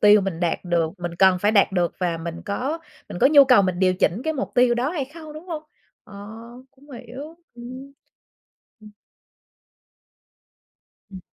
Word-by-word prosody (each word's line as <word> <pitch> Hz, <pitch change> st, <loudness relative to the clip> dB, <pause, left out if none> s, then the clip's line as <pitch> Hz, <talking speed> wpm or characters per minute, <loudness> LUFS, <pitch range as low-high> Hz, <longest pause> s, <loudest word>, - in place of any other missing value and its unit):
tiêu 210 Hz, 0 st, +7 dB
mình 185 Hz, -3 st, -4 dB
đạt 170 Hz, -2 st, 0 dB
được, 170 Hz, -2 st, 0 dB
mình 175 Hz, -1 st, -5 dB
cần 185 Hz, 0 st, +4 dB
phải 205 Hz, +3 st, +2 dB
đạt 200 Hz, -2 st, +4 dB
được 175 Hz, -2 st, 0 dB
và 175 Hz, -3 st, -1 dB
mình 170 Hz, +1 st, -6 dB
có 265 Hz, +11 st, -3 dB, 0.3 s
mình -, -, -7 dB
có -, -, +5 dB
nhu 285 Hz, -1 st, +7 dB
cầu 250 Hz, -6 st, +5 dB
mình 185 Hz, -2 st, -1 dB
điều 185 Hz, -1 st, +3 dB
chỉnh 190 Hz, +5 st, 0 dB
cái 315 Hz, -, 0 dB
mục 275 Hz, -3 st, -4 dB
tiêu 245 Hz, -1 st, +4 dB
đó 255 Hz, +5 st, -1 dB
hay 305 Hz, -6 st, -2 dB
không, 310 Hz, +2 st, -12 dB
đúng 310 Hz, +4 st, -11 dB
hông? 315 Hz, -3 st, -5 dB, 0.4 s
Ờ, 205 Hz, -, -15 dB, 0.6 s
cũng 285 Hz, +2 st, -21 dB
hiểu, 260 Hz, +6 st, -10 dB, 0.2 s
ừm. 255 Hz, +3 st, -10 dB, 0.9 s
Ừm. 210 Hz, 0 st, -14 dB, 2.2 s
Ừm. 190 Hz, -2 st, -9 dB
215 Hz, 175 wpm, -23 LUFS, 180-275 Hz, 2.2 s, tiêu